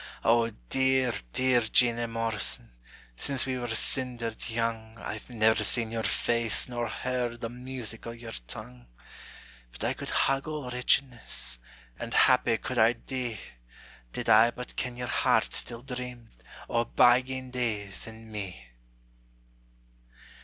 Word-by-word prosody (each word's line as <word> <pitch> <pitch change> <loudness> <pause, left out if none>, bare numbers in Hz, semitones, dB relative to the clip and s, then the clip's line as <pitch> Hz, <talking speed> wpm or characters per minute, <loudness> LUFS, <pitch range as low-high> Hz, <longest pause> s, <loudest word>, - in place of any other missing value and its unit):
O 115 0 +4 0.2
dear, 130 -2 +3 0.2
dear 130 - +3
Jeanie 120 +1 +3
Morrison, 115 - -2 0.4
Since 135 - 0
we 130 -1 -2
were 120 - -3
sindered 115 0 0
young 115 -1 -2
I've 110 +1 -6
never 110 -2 +3
seen 115 +1 +1
your 115 -1 -1
face 115 0 +1
nor 120 -1 -2
heard 125 -2 -2
The 115 - -4
music 125 -2 -6
o' - - -3
your 115 0 -8 0.2
tongue; 60 -1 -6 0.8
But - - -7
I - - +1
could - - -6
hug 135 +1 +1
all 150 -5 -4
wretchedness, 120 - +1 0.4
And 115 -2 -4
happy 125 -3 +5
could 120 +2 -3
I 110 +2 +6
dee, 120 -2 -4 0.7
Did - - -4
I 110 +2 +7
but 125 +1 -8
ken 125 -1 -2
your 125 - -3
heart 120 - +2
still 120 0 -5
dreamed 125 -3 -7 0.4
O' 115 0 +1
bygane 130 +2 +3
days 110 -6 -3
and 110 0 -11
me! 95 - -6
120 Hz, 135 wpm, -29 LUFS, 110-125 Hz, 0.8 s, I